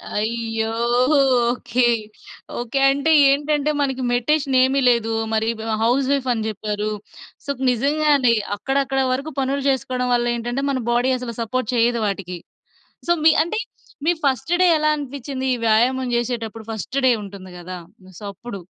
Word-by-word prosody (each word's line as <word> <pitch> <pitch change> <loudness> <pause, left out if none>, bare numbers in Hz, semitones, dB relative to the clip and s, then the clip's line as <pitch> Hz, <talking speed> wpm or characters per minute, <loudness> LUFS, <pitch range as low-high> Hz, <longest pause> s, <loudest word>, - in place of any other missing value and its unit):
అయ్యో! 225 +1 -2 0.8
Okay. 245 0 -1 0.8
Okay. 240 +3 -2
అంటే 280 +3 +1 0.2
ఏంటంటే, 295 +1 +1
మనకి 265 -2 -1
మెడిటేషన్ 275 +3 +1
ఏమి 265 +2 +2
లేదు. 230 -2 +1 0.2
మరి 220 0 +1
బ - - -6 0.2
హౌస్ 260 +3 +2
వైఫ్ 275 -2 0
అని 220 -2 -3
చెప్పారు. 210 0 -3 0.6
సో, - - -10
క్ - - -4
నిజంగానే 280 0 +2 0.2
అక్కడక్కడ 270 +4 -1
వరకు 275 +5 -2
పనులు 270 +1 -1
చేసుకోవడం 255 -1 -1
వల్ల 240 0 +2
ఏంటంటే, 240 +3 -3
మన 265 -2 -1
బాడీ 245 +2 +2
అసలు 245 -2 -6
సపోర్ట్ 240 0 -2
చేయదు 235 0 +2
వాటికి. 190 -3 -4 0.7
సో, - - +2
మీ 320 - +7
అంటే 385 +7 -3 0.5
మీ 340 - +4
ఫస్ట్ 270 +2 0
డే - - +6
ఎలా 305 0 +1
అనిపించింది 275 -2 -5
ఈ - - -6
వ్యాయామం 250 +4 +2
చేసేటప్పుడు 230 -2 -3
ఫస్ట్ 225 +5 -5
డే - - +6
ఉంటుంది 195 -2 -10
కదా! 180 +1 -7 0.4
సో, - - -13
అప్పుడు? 225 +1 -8
250 Hz, 150 wpm, -21 LUFS, 225-275 Hz, 0.8 s, మీ